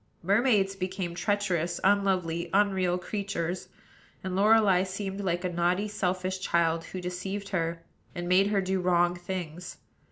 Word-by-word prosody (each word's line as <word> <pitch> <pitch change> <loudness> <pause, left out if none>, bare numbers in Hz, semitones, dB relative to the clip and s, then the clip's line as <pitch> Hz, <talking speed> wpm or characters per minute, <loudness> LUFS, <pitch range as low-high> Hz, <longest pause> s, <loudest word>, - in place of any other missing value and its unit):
Mermaids 200 0 +3
became 185 -2 -3
treacherous, 175 -3 -1
unlovely, 185 -4 +1
unreal 190 -3 +2
creatures; 185 -2 -3 0.6
and 185 -1 -3
Lorelei 205 -2 +5
seemed 195 +1 -4
like 175 -1 -1
a - - +1
naughty, 175 +4 +1
selfish 185 -2 -2
child, 165 -3 +1
who 185 - -6
deceived 190 +3 -4
her, 165 -3 -2 0.3
and 175 -1 -4
made 185 +2 +4
her 205 -1 +1
do 190 0 -1
wrong 175 -1 +3
things. 175 -1 -6
185 Hz, 135 wpm, -28 LUFS, 175-195 Hz, 0.6 s, Lorelei